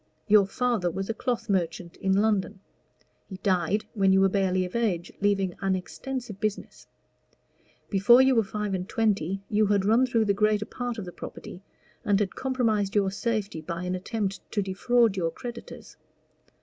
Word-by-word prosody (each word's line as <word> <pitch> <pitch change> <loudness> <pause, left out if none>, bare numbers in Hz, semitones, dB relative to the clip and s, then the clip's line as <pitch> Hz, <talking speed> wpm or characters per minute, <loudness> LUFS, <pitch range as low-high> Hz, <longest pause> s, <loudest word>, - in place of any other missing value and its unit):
Your 205 -2 +5
father 235 -5 0
was 195 +5 -3
a - - -3
cloth 235 -1 -3
merchant 175 -3 -2
in 190 - -1
London: 205 -1 +1 0.7
he 190 - -7
died 190 +2 +1
when 195 -3 +3
you 190 - +5
were 195 - +4
barely 185 -1 +1
of 180 - -8
age, 195 -7 -1
leaving 195 -2 +1
an 195 -1 +1
extensive 235 +3 -6
business: 215 -2 -4 1.0
before 205 +5 +5
you 265 0 +5
were 225 -2 +3
five 210 0 -4
and 185 +2 -3
twenty 195 -5 0
you 210 0 +2
had 200 -1 +2
run 230 +5 +4
through 230 -3 +1
the 200 - +2
greater 210 +1 +1
part 245 0 -5
of 210 - -5
the 175 - -7
property, 180 - -9 0.4
and 200 -1 +2
had 200 -3 -1
compromised 225 -7 0
your 195 -2 +2
safety 205 -5 -2
by 170 +2 -5
an 180 0 -2
attempt 195 +1 -3
to 205 - +1
defraud 220 +3 +2
your 170 -3 0
creditors. 235 +7 -9
200 Hz, 175 wpm, -26 LUFS, 190-225 Hz, 1.0 s, Your